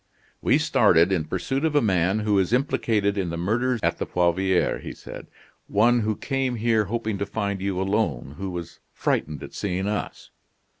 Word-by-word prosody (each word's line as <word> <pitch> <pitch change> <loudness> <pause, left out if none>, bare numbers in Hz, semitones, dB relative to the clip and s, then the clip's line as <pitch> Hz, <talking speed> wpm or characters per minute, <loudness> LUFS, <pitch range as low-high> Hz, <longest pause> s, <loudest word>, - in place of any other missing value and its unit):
"We - - +4
started 85 +3 +4
in 85 -5 +1
pursuit 135 - -2
of 160 -2 +1
a - - +6
man 95 0 +1
who 105 -2 +2
is 95 +3 0
implicated 110 -6 +1
in 90 -3 -1
the 85 - -4
murders 115 +8 0
at - - 0
the - - -2
Poivriere," 90 +1 +1
he - - -7
said; - - -10 0.4
"one 120 +4 +3
who 110 -1 0
came 135 -1 -1
here 110 -1 +2
hoping 110 -1 -3
to 100 - -1
find 100 -2 -2
you 95 -1 -1
alone, 95 - -1
who 95 0 -3
was 85 -2 -7
frightened 75 -2 -1
at - - -9
seeing 95 -1 -2
us." 105 0 -4
100 Hz, 185 wpm, -24 LUFS, 90-115 Hz, 0.4 s, a